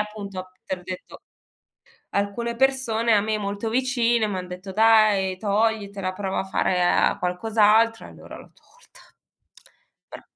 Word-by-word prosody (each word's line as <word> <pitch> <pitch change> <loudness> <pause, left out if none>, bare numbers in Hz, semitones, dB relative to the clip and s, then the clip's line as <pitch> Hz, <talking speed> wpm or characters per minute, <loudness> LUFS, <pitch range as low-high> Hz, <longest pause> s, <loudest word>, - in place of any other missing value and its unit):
appunto, 200 -3 -6
te 190 - -3
l'ho 180 - -14
detto, 185 0 -9 0.9
alcune 230 +4 -2
persone 235 -4 +1
a 205 - +4
me 215 +1 -1
molto 205 +2 -4
vicine 240 -2 +1
m'han 185 -3 -4
detto: 185 +2 -8
"Dai 215 -3 +4
toglitela, 200 -2 -1
prova 190 -1 -3
a - - -4
fare, 185 -1 0 0.3
uhm, - - -12
qualcos'altro", 220 +4 +2
e - - -13
allora - - -12
l'ho - - -16
tolta. 485 - -23 1.0
Però - - -9
210 Hz, 140 wpm, -23 LUFS, 190-225 Hz, 1.0 s, a